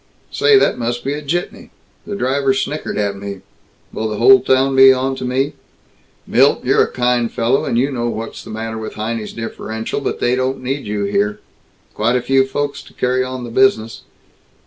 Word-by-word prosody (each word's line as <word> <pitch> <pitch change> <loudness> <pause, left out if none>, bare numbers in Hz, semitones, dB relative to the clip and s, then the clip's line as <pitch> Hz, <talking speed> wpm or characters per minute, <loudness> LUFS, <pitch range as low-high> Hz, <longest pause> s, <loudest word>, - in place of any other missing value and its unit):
Say, 430 -2 +4
that 400 - +2
must 120 +1 -2
be 140 - -1
a 150 - -5
jitney. 170 +5 -4 0.4
The 205 - -4
driver 135 -4 +1
snickered 145 -1 -3
at 100 -1 -1
me. 100 -1 -7 0.5
Will 110 0 -2
the 105 - -4
whole 200 - +7
town 135 +1 +2
be 135 0 +8
onto 130 0 -1
me? 135 +3 0 0.7
Milt, - - +3
you're - - +4
a - - -4
kind 125 -1 +1
young - - -3
fellow, 120 +4 0
and 115 - -1
you 135 +4 +1
know 120 -2 -2
what's 115 0 -6
the - - -12
matter 110 0 -5
with 110 - -7
Heinie's 110 0 -4
differential, 110 0 -5
but - - -3
they 120 +1 +1
don't 130 0 -2
need 135 -1 -3
you 105 0 -2
here. 100 +1 0 0.5
Quite 115 +3 +1
a 125 - +1
few 135 0 +3
folks 145 +1 -3
to - - -17
carry 125 +1 +1
on 130 0 -5
the 120 - -7
business. 115 - +2
125 Hz, 195 wpm, -18 LUFS, 110-135 Hz, 0.7 s, be